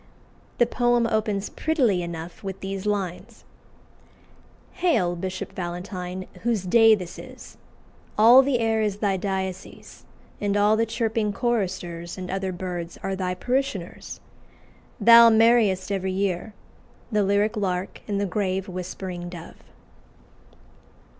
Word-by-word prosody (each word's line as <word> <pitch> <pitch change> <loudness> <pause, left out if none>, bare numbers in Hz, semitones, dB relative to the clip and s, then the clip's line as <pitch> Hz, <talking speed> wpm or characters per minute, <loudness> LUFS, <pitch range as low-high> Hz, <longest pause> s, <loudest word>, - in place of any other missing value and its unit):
The 240 - +5
poem 240 0 +2
opens 215 -3 -1
prettily 255 - +1
enough 170 +1 -7
with 195 0 -6
these 195 +1 -4
lines 200 +2 -3 1.3
"Hail, 245 - +1
Bishop 185 +1 -5
Valentine, 180 +1 -5 0.2
whose 230 -5 0
day 225 +4 +6
this 180 -4 -8
is! - - -12 0.6
All 235 +5 +8
the 270 -1 +1
air 225 -1 +1
is 210 -2 -1
thy 205 -2 0
diocese; 190 -1 -5 0.4
And 205 0 0
all 205 +1 +4
the 225 +1 +1
chirping 225 -2 -1
choristers 180 -8 -2
And 185 -1 -6
other 190 0 -2
birds 175 -2 -5
are 195 - -2
thy 180 -1 -2
parishioners. 250 -7 -3 0.8
Thou 230 +2 +9
marry'st 220 -4 +3
every 190 -1 -1
year 195 +2 -2 0.6
The 210 -1 +2
lyrique 205 +3 +1
lark 185 -2 -2
and 200 -2 -1
the 200 - 0
grave 190 0 -2
whispering 180 -1 -6
dove." 170 -1 -11
195 Hz, 125 wpm, -24 LUFS, 185-225 Hz, 1.3 s, Thou